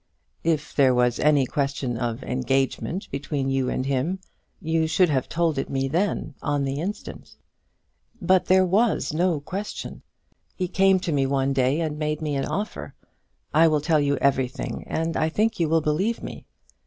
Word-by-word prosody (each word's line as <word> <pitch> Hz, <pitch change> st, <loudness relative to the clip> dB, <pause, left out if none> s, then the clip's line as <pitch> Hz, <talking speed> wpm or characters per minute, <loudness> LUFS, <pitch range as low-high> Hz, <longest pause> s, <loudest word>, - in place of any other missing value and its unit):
"If 160 Hz, -2 st, -1 dB
there 130 Hz, -3 st, +4 dB
was 125 Hz, -1 st, +2 dB
any 145 Hz, -3 st, +4 dB
question 140 Hz, -2 st, -2 dB
of 120 Hz, +2 st, -3 dB
engagement 135 Hz, +8 st, -1 dB
between 140 Hz, 0 st, -2 dB
you 135 Hz, -1 st, 0 dB
and 130 Hz, -, -2 dB
him, 140 Hz, +7 st, 0 dB, 0.4 s
you 160 Hz, -2 st, 0 dB
should 180 Hz, +2 st, +3 dB
have 130 Hz, -4 st, 0 dB
told 165 Hz, -4 st, 0 dB
it -, -, -3 dB
me 135 Hz, 0 st, -1 dB
then, 165 Hz, 0 st, -1 dB
on 145 Hz, -1 st, 0 dB
the 135 Hz, +2 st, -2 dB
instant." 205 Hz, +5 st, -6 dB, 0.8 s
"But 185 Hz, -1 st, +3 dB
there 185 Hz, 0 st, +4 dB
was 205 Hz, -1 st, +1 dB
no 170 Hz, -1 st, +1 dB
question. 195 Hz, +8 st, -6 dB, 0.5 s
He 185 Hz, -, -2 dB
came 190 Hz, +1 st, +3 dB
to 180 Hz, -, -2 dB
me 140 Hz, -2 st, +1 dB
one 135 Hz, 0 st, +1 dB
day 135 Hz, +3 st, +2 dB
and 150 Hz, -2 st, -3 dB
made 150 Hz, 0 st, -1 dB
me 150 Hz, -2 st, -2 dB
an 135 Hz, -, -1 dB
offer. 210 Hz, +2 st, -4 dB, 0.6 s
I 165 Hz, +2 st, +6 dB
will 155 Hz, -2 st, +2 dB
tell 155 Hz, +1 st, +2 dB
you 145 Hz, -1 st, +2 dB
everything, 130 Hz, -2 st, -1 dB
and 165 Hz, 0 st, -2 dB
I 155 Hz, -, +1 dB
think 215 Hz, +6 st, 0 dB
you 165 Hz, -2 st, +1 dB
will 165 Hz, 0 st, +3 dB
believe 180 Hz, +10 st, 0 dB
me. -, -, -8 dB
150 Hz, 175 wpm, -24 LUFS, 135-170 Hz, 0.8 s, I